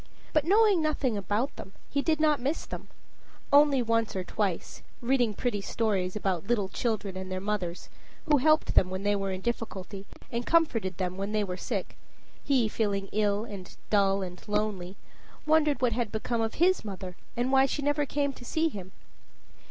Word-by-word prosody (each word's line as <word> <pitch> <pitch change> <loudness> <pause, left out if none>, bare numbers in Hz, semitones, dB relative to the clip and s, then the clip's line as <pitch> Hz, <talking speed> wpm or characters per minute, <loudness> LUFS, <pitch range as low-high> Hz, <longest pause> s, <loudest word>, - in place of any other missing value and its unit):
But, 305 -2 +3
knowing 405 -1 +5
nothing 295 -6 0
about 205 +7 -1
them, 190 - -9
he 280 - 0
did 315 +1 +1
not 305 -2 +3
miss 280 +6 -1
them - - -7 0.7
only 285 -3 +6
once 230 -2 +1
or 185 - -1
twice, 190 -1 -2 0.2
reading 240 -3 +1
pretty 225 -3 -1
stories 195 -4 -1
about 195 -3 -1
little 210 -5 +1
children 210 -3 -2
and 185 0 -6
their 185 - -2
mothers, 185 -3 -3 0.4
who 300 -3 +4
helped 310 +3 +3
them 185 - +4
when 185 +1 -4
they 205 0 +2
were 195 -1 -2
in 185 0 -4
difficulty 200 -3 -4 0.2
and 235 +1 -1
comforted 235 - +2
them 185 -1 -2
when 200 +2 -3
they 215 -1 +2
were 185 -2 -3
sick, - - -4 0.5
he 260 -5 +3
feeling 200 -3 -1
ill 210 0 +1
and 195 -5 -9
dull 195 -1 +3
and 180 -1 -7
lonely, 205 -3 -1 0.5
wondered 305 -3 +3
what 240 -2 +3
had 230 -2 -1
become 225 +2 -1
of 225 0 -1
his 365 +3 +3
mother 190 -3 -6 0.2
and 245 +2 +1
why 270 0 +5
she 290 - -3
never 290 +1 +2
came 280 0 0
to 250 - -12
see 320 +6 +1
him. 190 - -9
215 Hz, 185 wpm, -29 LUFS, 195-275 Hz, 0.7 s, only